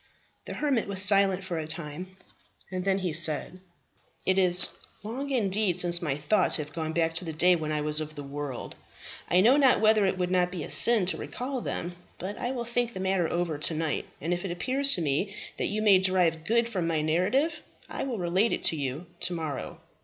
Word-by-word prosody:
The - - -6
hermit 275 -8 0
was 200 -1 -3
silent 195 -1 +4
for 175 -3 -3
a 155 - -5
time, 165 +4 -7 0.5
and 185 -1 -3
then 190 -3 0
said, 155 +2 +1 0.7
"It 190 0 +3
is 180 -1 +2 0.4
long 255 +7 -4
indeed 205 -7 +1
since 175 -1 -1
my 145 -5 -1
thoughts 180 +6 +2
have 150 -1 -4
gone 160 -1 -3
back 165 0 0
to 175 +2 -1
the 160 - -4
day 175 +3 +4
when 155 -2 -3
I 150 -1 -1
was 150 +1 0
of 155 0 -6
the 145 - -7
world. 140 -2 -6 0.6
I 180 - +5
know 245 +7 +6
not 270 -3 +5
whether 215 -2 +4
it 190 - -1
would 180 -1 -1
not 180 -1 +2
be 175 -4 -4
a - - -6
sin 230 -5 +4
to 185 - 0
recall 255 0 -4
them; 175 -4 -4 0.2
but 195 +3 -5
I 245 - -1
will 240 -2 -4
think 240 0 -1
the 185 - -6
matter 190 -3 +1
over 170 -4 -1
to 155 - +1
night, 155 -2 -2
and 165 +5 -1
if 175 - -3
it 195 - -3
appears 265 +10 +1
to 175 - -3
me 160 +8 -1 0.2
that - - 0
you 215 +1 -2
may 200 -3 +6
derive 180 -4 +2
good 235 +4 +2
from 185 -7 -2
my 160 -2 0
narrative, 210 - +1 0.3
I - - -5
will 255 -4 -2
relate 185 +5 +1
it - - -3
to - - +2
you 140 +3 -4
to 180 - -2
morrow." 155 -5 -5
180 Hz, 220 wpm, -28 LUFS, 160-210 Hz, 0.7 s, know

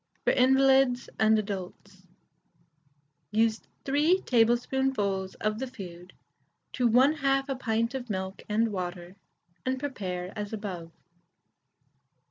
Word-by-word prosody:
FOR - - +5
INVALIDS 265 -1 +4
AND 220 0 +5
ADULTS. 190 -2 -6 1.2
Use 220 +1 +1 0.2
3 305 +7 +2
teaspoonfuls 235 -5 +1
of 215 +1 -2
the 265 - -3
food 180 -6 -10 0.6
to 245 -2 +2
1/2 270 +2 +3
a 270 - -2
pint 230 -1 -1
of 250 -2 -5
milk 190 -1 -4
and 220 +1 +1
water, 180 -1 -5 0.5
and 260 0 -1
prepare 190 -10 -4
as 210 0 -5
above. 185 -6 -5
225 Hz, 105 wpm, -28 LUFS, 190-265 Hz, 1.2 s, FOR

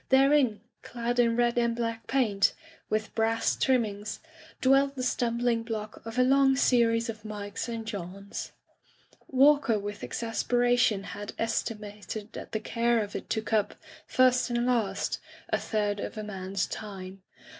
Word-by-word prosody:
Therein, 265 -5 +4 0.2
clad 240 0 -3
in 230 -1 +4
red 240 0 +2
and 235 -1 +1
black 230 -1 -3
paint, 215 -7 +2 0.3
with 215 0 -1
brass 225 0 +1
trimmings, 215 -6 0 0.4
dwelt 275 +1 +4
the 255 - -3
stumbling 240 -1 +1
block 220 -2 -6
of 225 +2 -6
a 250 - +5
long 270 +1 +4
series 230 -3 +3
of 220 -2 -6
Mikes 210 +1 -5
and 230 -1 -4
Johns. 200 -2 -6 0.8
Walker 275 -3 +4
with 205 0 -6
exasperation 245 -2 +1
had 205 +1 -7
es 225 0 +1
timated 210 -1 -7
that - - -8
the 220 - -1
care 235 +1 +1
of 205 - -8
it - - -6
took 220 0 -2
up, 210 -2 +2 0.3
first 255 0 +3
and 240 0 0
last, 225 -6 0 0.3
a - - +1
third 205 -2 -1
of 220 - -5
a 215 - -3
man's 195 -2 -3
time. 195 -2 -7
230 Hz, 150 wpm, -28 LUFS, 210-245 Hz, 0.8 s, a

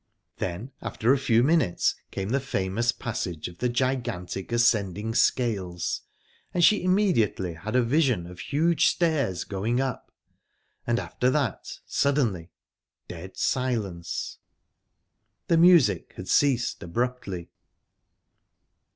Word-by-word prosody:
Then, 95 +9 -4
after 120 +4 +1
a - - +2
few 115 -3 +3
minutes 150 - +2 0.2
came 95 +1 -4
the 135 +4 +1
famous 115 -2 0
passage 90 - -4
of 90 - -12
the 125 - +1
gigantic 120 -7 -2
ascending 110 -3 +1
scales, 100 -9 0 0.5
and 175 - +2
she 210 - +4
immediately 180 - +1
had 100 +8 -5
a 125 - +4
vision 125 - +2
of 90 +1 -11
huge 160 +3 +2
stairs 145 - +1
going 110 +5 -1
up...And, 130 -2 -6
after 125 +1 -1
that, 130 -5 -2
suddenly 120 - 0 0.6
dead 90 +2 -9
silence. 105 -10 -2 1.1
The 170 - +3
music 170 -4 +5
had - - -8
ceased 130 -4 +2
abruptly... 100 -2 -3
120 Hz, 110 wpm, -26 LUFS, 95-135 Hz, 1.1 s, music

